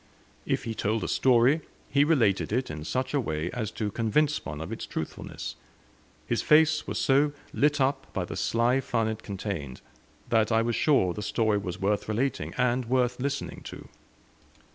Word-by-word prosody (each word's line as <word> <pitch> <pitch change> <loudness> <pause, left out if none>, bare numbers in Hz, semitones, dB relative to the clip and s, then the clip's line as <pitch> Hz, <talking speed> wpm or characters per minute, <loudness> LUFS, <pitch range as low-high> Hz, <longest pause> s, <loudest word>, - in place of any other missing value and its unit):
If - - 0
he 115 - -3
told 110 +1 -1
a - - -2
story, 130 +4 +4 0.3
he 140 +1 +3
related 125 - +2
it 125 -1 0
in 75 0 -6
such 130 - -2
a 145 - +3
way 80 -5 -2
as 115 -4 -3
to 105 -2 -2
convince 140 +8 +1
one 75 - -6
of 80 - -6
its - - -5
truthfulness; - - -5 0.7
his - - 0
face 155 0 +4
was - - -3
so 145 +2 +3 0.2
lit 150 +1 +2
up 135 0 0
by 95 -3 -2
the - - -6
sly 120 +3 +2
fun 115 -3 0
it 110 0 -3
contained, 95 - -5 0.5
that 110 -1 +3
I 115 0 +3
was 115 0 0
sure 115 - +3
the 105 - -5
story 105 0 +1
was 95 0 -5
worth 100 +2 0
relating, 125 +6 -1
and 125 0 +1
worth 125 0 +1
listening 140 +2 -3
to. - - -9
115 Hz, 180 wpm, -27 LUFS, 105-135 Hz, 0.7 s, story